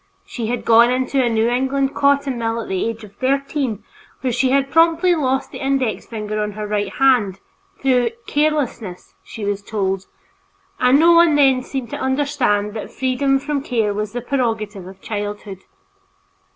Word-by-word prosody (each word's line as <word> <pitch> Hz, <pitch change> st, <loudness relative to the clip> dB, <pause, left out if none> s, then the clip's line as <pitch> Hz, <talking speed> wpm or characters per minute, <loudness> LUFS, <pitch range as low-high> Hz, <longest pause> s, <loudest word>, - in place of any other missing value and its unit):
She 230 Hz, -3 st, -5 dB
had 245 Hz, +1 st, -3 dB
gone 235 Hz, +1 st, +6 dB
into 260 Hz, +1 st, +1 dB
a 240 Hz, -, +1 dB
New 225 Hz, 0 st, +1 dB
England 265 Hz, +3 st, 0 dB
cotton 280 Hz, -3 st, +1 dB
mill 225 Hz, 0 st, -1 dB
at 230 Hz, -, -6 dB
the 190 Hz, +3 st, -1 dB
age 225 Hz, -1 st, -7 dB
of 205 Hz, -2 st, -12 dB
thirteen, 270 Hz, -3 st, -1 dB, 0.4 s
where 255 Hz, -2 st, -1 dB
she 255 Hz, +2 st, +1 dB
had 275 Hz, +1 st, +1 dB
promptly 330 Hz, +2 st, +4 dB
lost 265 Hz, -4 st, -1 dB
the -, -, -8 dB
index 265 Hz, -8 st, -1 dB
finger 215 Hz, -2 st, -4 dB
of 210 Hz, -1 st, -5 dB
her 215 Hz, 0 st, -4 dB
right 205 Hz, -2 st, -2 dB
hand, 240 Hz, -8 st, +2 dB, 0.4 s
through 250 Hz, -3 st, +2 dB, 0.2 s
"carelessness" 285 Hz, -11 st, -2 dB
she 215 Hz, -, -7 dB
was 200 Hz, 0 st, -2 dB
told, 195 Hz, -2 st, -2 dB, 0.7 s
and 250 Hz, +2 st, +5 dB
no 335 Hz, +2 st, +6 dB
one 335 Hz, -2 st, +5 dB
then 270 Hz, -3 st, +4 dB
seemed 255 Hz, -2 st, -6 dB
to -, -, -4 dB
understand 260 Hz, -7 st, 0 dB
that 220 Hz, -, -6 dB
freedom 270 Hz, +1 st, +1 dB
from 285 Hz, +1 st, -2 dB
care 225 Hz, -6 st, 0 dB
was 210 Hz, 0 st, -3 dB
the 245 Hz, -, -3 dB
prerogative 225 Hz, -7 st, -2 dB
of 190 Hz, 0 st, -13 dB
childhood. 205 Hz, -2 st, -6 dB
245 Hz, 170 wpm, -20 LUFS, 210-275 Hz, 0.7 s, gone